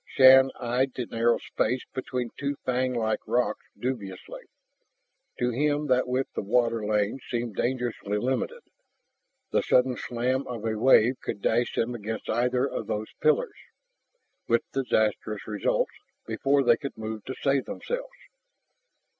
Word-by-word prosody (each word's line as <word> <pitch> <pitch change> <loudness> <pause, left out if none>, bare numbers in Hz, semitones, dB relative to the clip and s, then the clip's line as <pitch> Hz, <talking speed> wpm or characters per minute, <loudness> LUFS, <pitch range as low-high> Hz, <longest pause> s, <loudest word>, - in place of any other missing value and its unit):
Shann 130 0 +7
eyed 125 +2 0
the 125 - -2
narrow 115 +1 +2
space 125 +3 -1
between 125 -2 -3
two 140 0 -2
fanglike 125 -4 0
rocks 125 0 0
dubiously. 105 -8 -5 1.0
To 125 0 +1
him 145 +4 +1
that 130 0 +3
width 130 +2 -2
of 100 - -3
water 115 -1 +2
lane 105 +3 0
seemed 120 -3 -2
dangerously 120 -5 -1
limited, 130 - -2 0.9
the - - +3
sudden 125 0 +3
slam 125 +3 -1
of 115 -3 -5
a 110 -1 0
wave 125 +1 +4
could - - -4
dash 120 +4 +1
them 120 +2 0
against 110 -1 -4
either 125 +3 +1
of 110 - -5
those 110 -1 -3
pillars, 465 -1 +2 0.9
with 115 0 +3
disastrous 110 -5 0
results, 105 -2 0 0.3
before 135 +5 +2
they 120 -2 +5
could 140 - -7
move 110 -1 -5
to 130 - -5
save 135 -1 +1
themselves. - - -4
125 Hz, 140 wpm, -27 LUFS, 110-130 Hz, 1.0 s, Shann